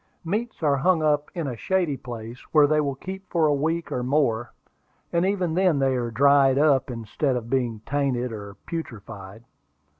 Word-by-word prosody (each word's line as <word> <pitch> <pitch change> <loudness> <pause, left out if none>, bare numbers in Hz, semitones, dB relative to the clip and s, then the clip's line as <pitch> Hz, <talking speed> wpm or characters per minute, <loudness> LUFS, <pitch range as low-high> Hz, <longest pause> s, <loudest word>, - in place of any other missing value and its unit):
Meats 210 +2 -3
are 145 -2 +3
hung 165 +3 +2
up 150 -1 +1
in 170 -3 -2
a 130 -3 -3
shady 175 - 0
place, 120 -2 -8
where 150 -2 +7
they 150 +1 +2
will 140 -2 -2
keep 190 +6 -8
for 165 -3 +2
a 150 - +3
week 160 +4 -1
or 125 - -1
more; 125 -4 0 0.6
and 170 +2 +2
even 185 -4 0
then 180 -3 +3
they 135 -1 +2
are 120 -2 -1
dried 135 +2 +4
up, 140 -3 +3
instead 120 +3 -2
of 115 -1 -5
being 120 -5 0
tainted 135 -4 -1
or 100 -2 -8
putrefied. 110 - -7
140 Hz, 180 wpm, -25 LUFS, 120-160 Hz, 0.6 s, where